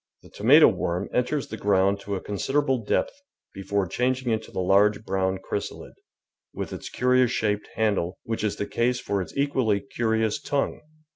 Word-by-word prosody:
The - - -17
tomato - - +6
worm 90 +3 -1
enters 130 +3 0
the 110 - -6
ground 100 -1 +2
to 100 0 -4
a 95 - -4
con 105 - -5
siderable 135 0 0
depth 285 - -1 0.3
before 100 0 -1
changing 125 +6 -1
into 110 0 -2
the - - -4
large 100 +4 +3
brown 95 0 0
chrysalid, 100 +2 -5 0.6
with - - -5
its - - -7
curious 125 0 +3
shaped 105 -3 -1
handle, 100 -5 0
which 115 -2 -3
is 105 - 0
the 100 - -3
case 120 +3 0
for 100 -4 -2
its 90 - -8
equally 130 -7 +1
curious 110 +1 -1
tongue. 140 -1 -1
105 Hz, 170 wpm, -25 LUFS, 100-125 Hz, 0.6 s, tomato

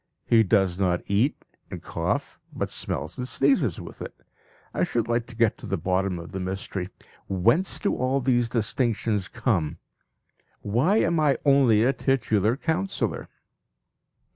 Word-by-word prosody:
He 115 -1 +5
does 95 -3 +2
not 90 -2 +1
eat 110 +9 0 0.2
and - - -6
cough, - - -3
but - - -3
smells 80 - -3
and 125 - -3
sneezes 135 - +2
with - - -10
it. - - -8 0.5
I - - 0
should 115 -2 -1
like 120 0 0
to 120 - -12
get 115 -2 +2
to - - -8
the 95 - -1
bottom 90 +2 0
of 85 0 -9
the 95 - -4
mystery 95 0 -4 0.4
whence 115 - +2
do 200 - 0
all 130 +2 0
these 120 -2 +1
distinctions 110 -3 0
come? 95 - -1 0.8
Why 130 - +2
am 170 -4 +2
I 150 -3 +3
only 135 -6 +5
a 130 +3 +3
titular 115 -5 +1
councillor? 175 +6 -2
115 Hz, 150 wpm, -25 LUFS, 95-135 Hz, 0.8 s, He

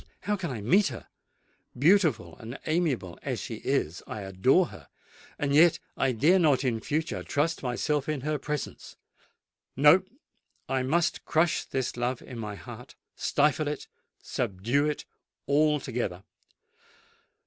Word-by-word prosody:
how 210 - 0
can 185 -4 -4
I 120 -6 -4
meet 185 - +4
her? 125 -5 -7 0.7
Beautiful 155 - +3
and 115 +3 -7
amiable 155 - -1
as - - -3
she - - -5
is, 80 +4 -1
I 105 - -5
adore 100 - +3
her;—and 140 - -7
yet 165 +3 +6 0.2
I 135 - +1
dare 150 +11 +4
not 145 -6 +3
in 120 -4 0
future 155 +7 -2
trust 155 +3 -1
myself 135 +4 -1
in 150 -3 -1
her 150 +1 -1
presence! 150 +1 -5 0.8
No:—I 150 - +1
must 160 +6 +1
crush 160 +1 +1
this 130 -2 -3
love 120 +1 -2
in 120 -3 -8
my 105 -2 -5
heart—stifle 150 +8 -2
it—subdue 140 -3 -2
it 150 - -3 0.4
altogether! 135 -10 +1
145 Hz, 125 wpm, -28 LUFS, 120-160 Hz, 0.8 s, yet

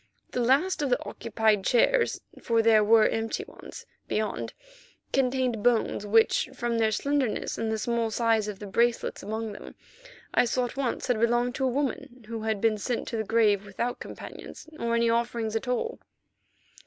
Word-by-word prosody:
The - - -2
last 290 +10 +2
of 285 - 0
the 245 - +2
occupied 220 -2 0
chairs, 465 - +2 0.2
for 230 -1 +2
there 220 -1 +5
were 220 +1 +5
empty 225 - -2
ones - - -11 0.2
beyond, 215 0 -2 0.6
contained 255 -4 +1
bones 230 -3 +1
which, 225 +4 +3
from 240 -2 -1
their 220 -1 +3
slenderness 280 0 -1
and 225 -1 -1
the 220 - 0
small 230 +1 -1
size 225 -1 +1
of 210 -2 -5
the 205 - -8
bracelets 235 +4 0
among 220 +2 -4
them, 205 - -10 0.6
I - - +4
saw 250 +2 0
at 245 - -7
once 270 -3 -2
had 245 -4 0
belonged 240 +1 +2
to 265 - 0
a 255 -1 0
woman 255 -4 -3
who 225 -1 -5
had 220 -1 -1
been 215 0 +1
sent 240 +3 -2
to 230 - -3
the 220 - -1
grave 215 -2 +2
without 205 +5 -3
companions - - -9
or 235 0 0
any 235 0 +2
offerings 230 -1 -1
at 225 +3 -2
all. 350 - -2
230 Hz, 180 wpm, -27 LUFS, 220-245 Hz, 0.6 s, there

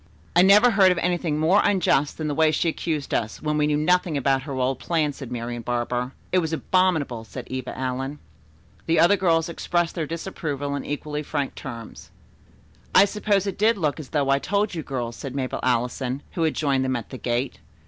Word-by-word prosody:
"I 175 - +7
never 205 +6 +7
heard 195 -3 +5
of 180 - 0
anything 170 -3 0
more 170 +7 +4
unjust 175 -7 +2
than 155 - -3
the 150 - -1
way 160 +2 +4
she 155 +2 0
accused 155 -3 -2
us, 110 -1 -1
when 150 0 -1
we 150 0 +2
knew 150 -1 +1
nothing 170 0 +2
about 135 -1 +2
her - - -3
old 130 0 -1
plan," 155 -4 0
said 135 -3 -9
Marian 120 0 -4
Barber. 120 +2 -2 0.2
"It 185 - +4
was 160 -2 -2
abominable," 160 -8 +1
said 120 +2 -9
Eva 130 -1 -5
Allen. 130 +2 -3 0.7
The 165 0 +3
other 185 +4 +6
girls 165 -4 +2
expressed 170 0 -1
their 160 -4 -3
disapproval 150 -4 -4
in 140 - -4
equally 150 +1 -3
frank 145 -2 -3
terms. 115 -5 -9 0.9
"I 195 - +8
suppose 205 -1 0
it 195 -1 -4
did 220 +1 +4
look 155 -4 -1
as 145 - -8
though 140 -3 +1
I 140 - +3
told 200 +5 0
you 165 - -3
girls," 120 -5 -4
said 135 -2 -7
Mabel 130 -2 -2
Allison, 125 +2 -1
who 170 - -4
had 160 -1 +1
joined 140 -3 +1
them 130 0 0
at 120 -3 -6
the 130 - -7
gate. 120 +2 -2
150 Hz, 205 wpm, -24 LUFS, 130-175 Hz, 0.9 s, I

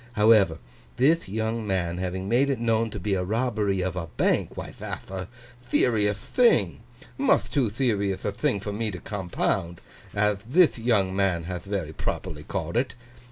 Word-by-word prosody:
However, 105 -6 +5 0.4
thith 155 - +3
young 110 +1 -2
man 90 -3 -1
having 95 +1 -3
made 125 +6 +3
it 135 - +1
known 115 -1 +1
to 105 - -6
be 100 +2 -1
a 95 -1 0
robbery 105 -2 0
of 90 -1 -2
a 85 -2 -3
bank, - - 0
why, - - -5
that'h - - -6
a 95 -2 -4 0.4
theriouth 105 -4 +3
thing; 105 - +2 0.4
muth 275 0 +2
too 135 -6 +2
theriouth 100 -5 0
a 105 - +1
thing 125 +1 0
for 100 +1 -5
me 110 +1 -1
to 95 - -5
compound, 90 -3 -2 0.4
ath 105 -1 +1
thith 170 -5 +5
young 105 -5 +2
man 95 -4 +1
hath 90 +1 -5
very 95 -6 -3
properly - - -4
called 85 +6 -3
it. 130 +2 0
105 Hz, 170 wpm, -26 LUFS, 95-115 Hz, 0.4 s, However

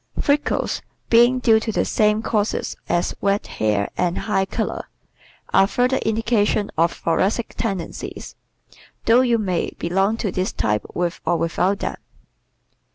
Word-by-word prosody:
Freckles, 290 +1 0 0.3
being 240 +2 +6
due 225 -3 +4
to 220 0 -3
the - - 0
same 210 0 +2
causes 210 -1 -1
as 175 0 +1
red 200 +1 +1
hair 105 -2 0
and 180 -1 0
high 195 -3 0
color, - - -3 0.7
are 195 - +5
further 250 +5 +1
indications 220 -2 +1
of 165 +1 +3
thoracic 200 +7 -1
tendencies, 195 -7 -5 0.7
though 235 +2 +6
you 240 -2 +3
may 185 -6 -2
belong 195 +5 +1
to 210 -5 -2
this 185 +1 -1
type 105 0 0
with 175 0 -2
or 175 - +1
without 175 +4 0
them. - - -4
205 Hz, 140 wpm, -22 LUFS, 175-225 Hz, 0.7 s, being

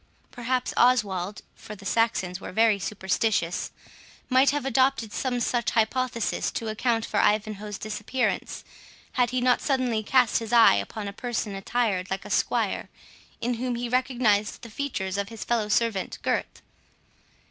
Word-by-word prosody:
Perhaps 250 0 -2
Oswald 210 -6 +2
(for 210 - -10
the 200 0 -14
Saxons 195 -5 0
were - - -7
very 220 +1 +3
superstitious) 190 -1 -1 0.6
might 260 +1 +5
have 290 -1 -1
adopted 260 -4 +1
some 250 -2 -1
such 240 -1 0
hypothesis, 235 0 0
to 225 - -4
account 225 +1 0
for - - -1
Ivanhoe's 210 -1 0
disappearance, 215 +5 -2 0.5
had 245 -2 +2
he 255 -1 -1
not 250 0 +3
suddenly 255 -5 0
cast 250 +2 +3
his 225 -1 -6
eye 235 -2 +7
upon 200 - -3
a 200 - -5
person 230 -3 -3
attired 195 -2 -1
like 190 - -3
a - - -8
squire, - - 0 0.5
in 245 +2 0
whom 250 -1 -1
he 240 +1 -3
recognised 240 -5 +1
the 230 - -9
features 200 -7 -3
of 200 0 -3
his 225 -2 -7
fellow 225 -3 0
servant 210 -2 0
Gurth. - - -2
225 Hz, 150 wpm, -26 LUFS, 205-250 Hz, 0.6 s, eye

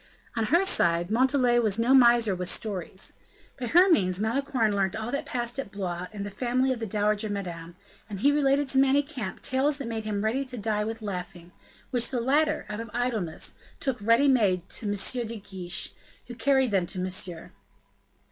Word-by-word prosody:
On 225 -1 0
her 340 - +3
side, 175 - +2
Montalais 250 0 +3
was 215 -3 +1
no 235 +3 +3
miser 235 -5 +6
with 180 0 -3
stories. 190 -3 -3 0.5
By 245 - -3
her 355 +8 +6
means, 185 - +3
Malicorne 225 -1 0
learnt 195 -2 0
all 220 +2 -4
that 280 - -3
passed 240 +1 -2
at 270 - -5
Blois, 180 -3 -4
in 205 -2 -6
the 200 - -6
family 255 +4 0
of 245 - -7
the 225 - -3
dowager 210 +1 0
Madame; 175 -4 -5 0.3
and 200 -2 -6
he 285 - +5
related 285 -1 +2
to 265 - +3
Manicamp 270 -5 0
tales 275 +3 +1
that 275 -4 -5
made 225 -1 -3
him 210 -1 -2
ready 240 +6 0
to 255 -2 -7
die 210 -1 -1
with 225 +1 -5
laughing, 180 -3 -6 0.4
which 245 -2 +1
the 255 - -1
latter, 300 +5 +1
out 210 0 -5
of 230 0 -6
idleness, 230 -9 -2 0.3
took 260 -5 -2
ready 230 +6 +4
made 195 -9 +2
to 215 - -3
M. 205 +4 0
de 230 0 -5
Guiche, 185 -3 -5 0.3
who 245 - -9
carried 265 0 +2
them 185 -3 +1
to 190 - -7
Monsieur. 185 -2 -3
225 Hz, 190 wpm, -27 LUFS, 195-260 Hz, 0.5 s, miser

